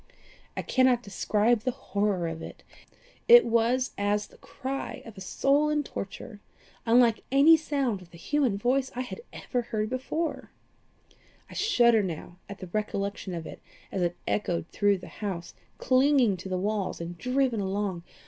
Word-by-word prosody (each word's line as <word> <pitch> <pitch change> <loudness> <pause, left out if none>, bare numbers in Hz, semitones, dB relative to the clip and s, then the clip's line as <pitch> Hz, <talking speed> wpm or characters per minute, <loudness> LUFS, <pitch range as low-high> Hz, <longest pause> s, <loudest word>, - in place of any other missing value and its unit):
I - - -2
cannot 255 -2 +3
describe 210 +3 +1
the 250 +4 -2
horror 200 -7 -1
of 165 0 -5
it. - - -10 0.6
It 480 0 +9
was 235 +3 +2
as 205 +1 +1
the - - -20
cry 270 +1 -5
of 225 -2 -11
a 190 - -10
soul 280 +10 +2
in 300 -1 +1
torture 205 -2 -7 0.5
unlike 230 -1 +4
any 285 +4 +7
sound 275 -10 -1
of 180 - -15
the 170 - -14
human 260 - 0
voice 255 +5 +1
I 250 - -2
had 255 - -7
ever 245 - -3 0.2
before 260 +7 -2
heard. - - -13 1.0
I - - -9
shudder 240 - +4
now 175 -1 -6
at 200 - -7
the 185 - -8
recollection 200 -3 -2
of 165 -1 -5
it - - -9 0.3
as 190 - -2
it 175 0 0
echoed 175 -5 -1
through 205 -1 +2
the 185 - -11
house, 185 -5 -4 0.2
clinging 260 -5 +3
to 185 +2 -8
the 185 - -1
walls 200 +1 -2
and 170 +1 -6
driven 250 +3 0
along. 195 -2 -2
215 Hz, 165 wpm, -28 LUFS, 195-260 Hz, 1.0 s, It